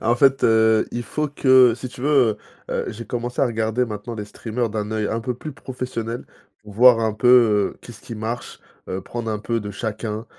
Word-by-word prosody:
En 115 +2 +2
fait, 135 +1 +4
heu, 110 -1 +4
il 120 - -3
faut 150 +4 -2
que 130 -4 +5
si 130 +1 -7
tu 125 - -12
veux, 145 +4 0 0.6
heu - - -2
heu, - - -3
j'ai 115 +2 -8
commencé 120 0 -3
à 135 - +4
regarder 110 +1 0
maintenant 110 +1 -6
les 105 -1 -5
streamers 115 +2 -4
d'un 105 0 -3
œil 110 -1 -1
un 115 - -2
peu 125 +2 -3
plus 150 +4 -8
professionnel. 125 -4 -5 0.4
Voir 115 +3 +5
un 110 -1 +1
peu, 120 +3 +1
heu, 110 -5 +4
qu'est-ce 120 - -12
qui 115 - -8
marche, 110 +3 -5 0.3
heu, 95 - -3
prendre 115 0 -5
un 105 - -2
peu 115 +2 -2
de 105 -1 -6
chacun, 110 +1 -4
115 Hz, 215 wpm, -22 LUFS, 110-125 Hz, 0.6 s, que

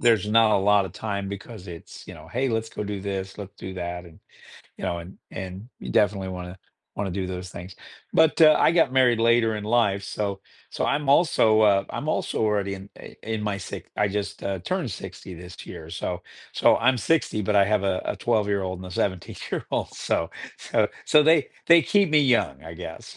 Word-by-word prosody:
there's 110 -4 +3
not 110 0 +5
a - - +4
lot 100 0 +4
of 95 - -7
time 100 -1 -4
because 100 0 -8
it's, 85 -2 -10
you - - -9
know, - - -13
"Hey, 130 +3 -1
let's 115 -1 -1
go 105 - -5
do 100 -1 -4
this, 95 -1 -4
let's 100 -1 -9
do 95 - -7
that," 90 -1 -5
and 85 -2 -16 0.6
you - - -7
know 85 - -1
and 85 +3 -10
and 95 +4 -7
you - - -6
definitely 100 -2 +2
wanna 90 0 -7 0.4
wanna 100 -1 -3
do 95 +1 -3
those 90 0 -5
things, 90 +1 -9 0.4
but, 160 -1 +4
uh, 155 -1 +9
I - - +5
got 165 -6 +3
married 125 -3 +4
later 115 -1 +3
in 105 - -5
life, 105 -3 +2
so 100 -1 -3 0.3
so - - -2
I'm 145 -1 0
also, 135 -8 +4
uh 100 -2 +4
I'm - - -5
also - - -1
already 100 -2 0
in, 95 +1 -11
uh - - -11 0.2
in 110 -1 -3
my 105 -2 -1
si 95 - -7
I 105 - +2
just, 100 +1 -4
uh, 100 -1 -2
turned 170 - -2
60 95 0 -8
this 90 +2 -10
year, 80 - -9
so 90 +1 -4 0.3
so - - +4
I'm 125 +1 +3
60, 155 -4 +1
but 105 +1 +1
I 100 - +6
have 105 0 +1
a 95 -2 0
a - - -2
twelve-year-old 100 -5 0
and 95 - -8
a - - -9
seventeen-year-old, 95 0 -3
so - - -1 0.3
so - - +1 0.2
so 150 - +6
they, 160 -1 +4 0.2
they 170 0 +8
keep 200 -1 +2
me 150 -1 +5
young, 120 - +2
I 80 +1 -9
guess. 80 -1 -9
100 Hz, 210 wpm, -25 LUFS, 95-115 Hz, 0.6 s, uh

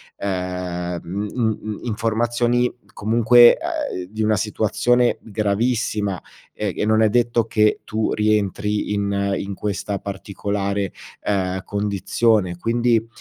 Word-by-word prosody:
ehm, 90 -2 -3
uhm 100 +4 -3
uhm 110 -4 0
uhm, 105 -1 -5
informazioni 120 +2 0 0.2
comunque, 120 +3 +6
ehm, 315 - -3
di 110 +1 -3
una 110 -1 +2
situazione 110 +4 +1
gravissima 105 -2 -1 1.0
e 105 -3 -3
e - - -1
non 110 +1 +3
è 110 - +5
detto 120 0 +2
che 105 -1 +2
tu 110 0 -1
rientri 105 0 0
in 100 -1 0
in 100 0 -4
questa 100 0 -3
particolare, 100 0 -3 0.3
ehm, 95 -2 -1
condizione, 100 -1 0
Quindi, 115 +2 +1
105 Hz, 120 wpm, -21 LUFS, 100-115 Hz, 1.0 s, comunque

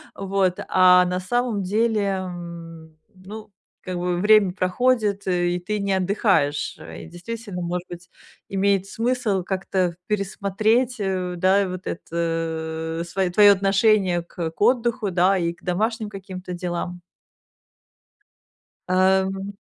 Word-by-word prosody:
вот, 195 -2 0
а 180 -1 +6
на 180 0 -1
самом 220 +1 -1
деле, 215 +2 +1
м, 170 -4 -6 0.2
ну, 205 +3 -10 0.3
как 185 -1 -5
бы, 175 0 -1
время 210 -2 +5
проходит, 205 +1 +1
и 175 -1 +1
ты 210 +1 -1
не 200 -1 0
отдыхаешь. 190 - +1 0.2
И - - -9
действительно, 180 +2 -7
может 175 +1 -3
быть, 175 0 -10 0.4
имеет 195 0 +1
смысл 230 -4 -1
как-то 185 -2 -1
пересмотреть, 215 +4 0
э, 185 -2 -2
да, 190 +2 +3
вот 185 0 -7
это 165 -1 -3
свое 185 +1 -1
твоё 205 +2 +7
отношение 195 -2 +2
к 170 -1 -5
к 165 - -20
отдыху, 235 -3 +2
да, 185 +2 +3
и 170 -1 -1
домашним 215 +4 -1
каким-то 185 -2 -8
делам. 175 0 -4 1.9
Эм. 190 +1 +1
190 Hz, 120 wpm, -23 LUFS, 175-205 Hz, 1.9 s, твоё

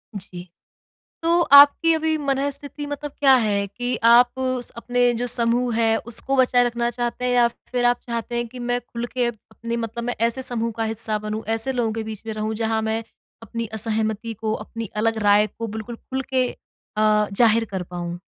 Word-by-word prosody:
जी। 185 -2 -9 0.8
तो 335 +1 +3
आपकी 285 +4 +8
अभी 320 0 0
मनःस्थिति 280 +1 -3
मतलब 290 0 -5
क्या 270 -2 +6
है 200 -1 0
कि 245 +4 -3
आप 240 +1 +7
स 255 -1 0
उस 245 - -6
अपने 245 +1 +1
जो 240 +1 -2
समूह 240 0 +1
है 225 -1 +3
उसको 265 +3 -1
बचाए 250 -1 +4
रखना 240 0 -1
चाहते 240 +1 -3
हैं 250 - +1
या 240 -1 +5
फिर 245 +1 -4
आप 245 0 +3
चाहते 235 0 -4
हैं 240 0 -1
कि 250 - -11
मैं 245 0 -1
खुल 240 -1 -6
के 250 -1 0
अपनी 230 0 -6
मतलब 230 0 -4
मैं 245 0 -2
ऐसे 235 +3 0
समूह 230 -2 0
का 225 - -1
हिस्सा 220 -1 -1
बनूँ, 215 +1 -4
ऐसे 225 +4 +2
लोगों 240 -3 0
के 225 0 -3
बीच 220 -2 -7
में 220 - -3
रहूँ, 215 +1 -2
जहाँ 220 0 0
मैं 220 +1 -1 0.4
अपनी 230 0 -5
असहमति 220 0 -1
को 220 -1 -1
अपनी 225 0 -7
अलग 225 +1 +1
राय 205 +1 +5
को 230 +2 -7
बिल्कुल 220 +2 -6
खुल 265 +3 -5
के 255 -1 +2 0.5
अ, 210 -1 +3
ज़ाहिर 225 +2 +4
कर 190 -2 -3
पाऊँ? 175 0 -6
235 Hz, 195 wpm, -22 LUFS, 220-245 Hz, 0.8 s, आपकी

